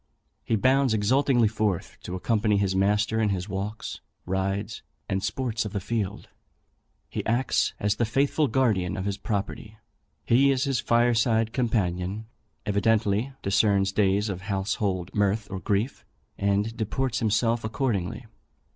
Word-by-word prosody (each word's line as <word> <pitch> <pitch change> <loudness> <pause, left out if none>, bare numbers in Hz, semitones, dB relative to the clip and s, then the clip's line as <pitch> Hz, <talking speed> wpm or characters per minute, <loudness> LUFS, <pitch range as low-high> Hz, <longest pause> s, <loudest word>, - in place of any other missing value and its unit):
He 115 - 0
bounds 130 +2 +3
exultingly 120 +2 +3
forth 105 -4 -2
to 90 - -5
accompany 105 +2 +1
his 100 -1 +1
master 105 +3 +2
in 105 - +2
his 95 -1 -2
walks, 100 +2 -5 0.2
rides, 95 +3 -2 0.3
and 95 -1 -1
sports 120 -3 -1
of 105 -2 -6
the 100 - -1
field. 105 0 -3 0.8
He - - -4
acts 120 +3 +1
as 105 0 0
the - - +1
faithful 140 +6 +1
guardian 110 -9 +1
of 95 - -3
his 100 0 -2
property. 105 +1 -4 0.5
He 135 +4 +4
is 135 -1 +2
his 135 -4 0
fire 120 +1 +3
side 115 -1 +2
companion, 105 -4 -1 0.4
evidently 105 +3 +1
discerns 100 -1 +3
days 100 +1 +2
of 95 -3 -4
household 95 -2 -2
mirth 105 +1 +1
or 95 - -3
grief, 105 +6 -1 0.3
and 100 +3 0
deports 120 +2 -1
himself 115 +1 +1
accordingly. 110 - -2
105 Hz, 140 wpm, -26 LUFS, 100-115 Hz, 0.8 s, He